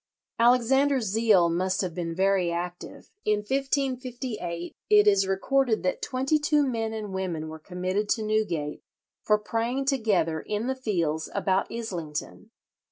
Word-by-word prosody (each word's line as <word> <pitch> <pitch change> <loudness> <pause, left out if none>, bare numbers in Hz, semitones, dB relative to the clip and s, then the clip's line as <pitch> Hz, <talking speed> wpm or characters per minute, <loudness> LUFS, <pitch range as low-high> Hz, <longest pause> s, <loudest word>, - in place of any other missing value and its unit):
Alexander's 255 +2 +4
zeal 210 -3 +4
must 185 +3 0
have 180 -3 -3
been 165 -1 -4
very 190 -2 +2
active. 175 +1 -6
In 210 -1 +1
1558 255 -8 -3
it 210 0 +6
is 200 -2 +4
recorded 230 +5 +1
that 185 - -1
twenty 265 +4 0
two 295 -1 +2
men 225 -4 -2
and 215 -3 -5
women 175 -5 -3
were 160 0 -8
committed 185 +5 -2
to 220 - +1
Newgate 210 -9 -1 0.4
for 210 - +3
praying 230 +5 -2
together 205 - +1
in 210 +2 -3
the 260 - 0
fields 170 -11 -1
about 190 -1 +1
Islington. 180 -5 -5
210 Hz, 140 wpm, -27 LUFS, 180-245 Hz, 0.4 s, it